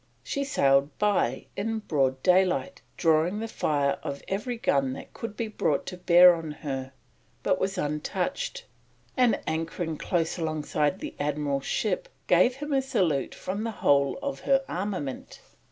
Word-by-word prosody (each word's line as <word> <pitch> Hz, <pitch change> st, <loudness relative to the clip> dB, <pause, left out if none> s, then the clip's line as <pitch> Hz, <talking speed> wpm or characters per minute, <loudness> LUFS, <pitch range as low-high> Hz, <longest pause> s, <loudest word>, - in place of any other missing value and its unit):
She 280 Hz, -, -2 dB
sailed 140 Hz, -, +2 dB
by 200 Hz, -, +1 dB
in 225 Hz, +3 st, -2 dB
broad 135 Hz, -10 st, 0 dB
daylight, 180 Hz, -7 st, +2 dB, 0.2 s
drawing 165 Hz, +4 st, +2 dB
the 225 Hz, -, -3 dB
fire 145 Hz, -9 st, 0 dB
of 140 Hz, -, -5 dB
every 215 Hz, +5 st, -2 dB
gun 135 Hz, -, +1 dB
that -, -, -10 dB
could 220 Hz, -2 st, -7 dB
be 230 Hz, -, -2 dB
brought 155 Hz, -9 st, 0 dB
to 180 Hz, -, -6 dB
bear 180 Hz, 0 st, +7 dB
on 165 Hz, -2 st, -5 dB, 0.2 s
her, 135 Hz, -2 st, -3 dB, 0.5 s
but -, -, +2 dB
was 195 Hz, +1 st, -1 dB
untouched, 150 Hz, -, -2 dB, 0.5 s
and, 250 Hz, -3 st, +3 dB
anchoring 165 Hz, 0 st, -2 dB
close 165 Hz, +1 st, -1 dB
alongside 155 Hz, -2 st, -1 dB
the -, -, -5 dB
Admiral's 145 Hz, -1 st, -1 dB
ship, -, -, -1 dB, 0.2 s
gave 250 Hz, +1 st, +4 dB
him 295 Hz, +2 st, -4 dB
a 270 Hz, -, +3 dB
salute 170 Hz, -, 0 dB
from 200 Hz, +3 st, -4 dB
the 230 Hz, -, -2 dB
whole 140 Hz, -9 st, +2 dB
of 280 Hz, -1 st, -3 dB
her 270 Hz, 0 st, +2 dB
armament. 180 Hz, -8 st, -4 dB
170 Hz, 155 wpm, -27 LUFS, 145-215 Hz, 0.5 s, bear